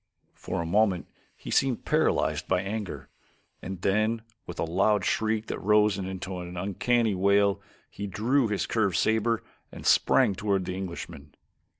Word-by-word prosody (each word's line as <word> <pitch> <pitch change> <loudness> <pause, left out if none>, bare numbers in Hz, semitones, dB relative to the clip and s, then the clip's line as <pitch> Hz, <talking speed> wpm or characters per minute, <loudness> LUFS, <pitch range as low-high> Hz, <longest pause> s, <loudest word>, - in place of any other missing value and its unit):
For 85 - -4
a - - -6
moment 95 0 +2 0.3
he - - -8
seemed 135 -4 +1
paralyzed - - +1
by 90 -1 +2
anger, 100 0 -5 0.5
and 95 -1 -7
then 110 +3 +1 0.2
with 90 - -7
a - - -1
loud 95 +4 +2
shriek 110 0 0
that - - -4
rose 105 0 +3
into 95 -1 -5
an 90 0 -7
uncanny 110 +5 +1
wail, 100 +1 +2 0.3
he 100 - -6
drew 115 +7 +1
his 105 -2 -1
curved 100 -6 0
saber 110 +4 +1 0.3
and - - -10
sprang 100 - +4
toward 100 -1 -1
the 90 - -3
Englishman. 85 -6 -7
100 Hz, 155 wpm, -27 LUFS, 95-110 Hz, 0.5 s, sprang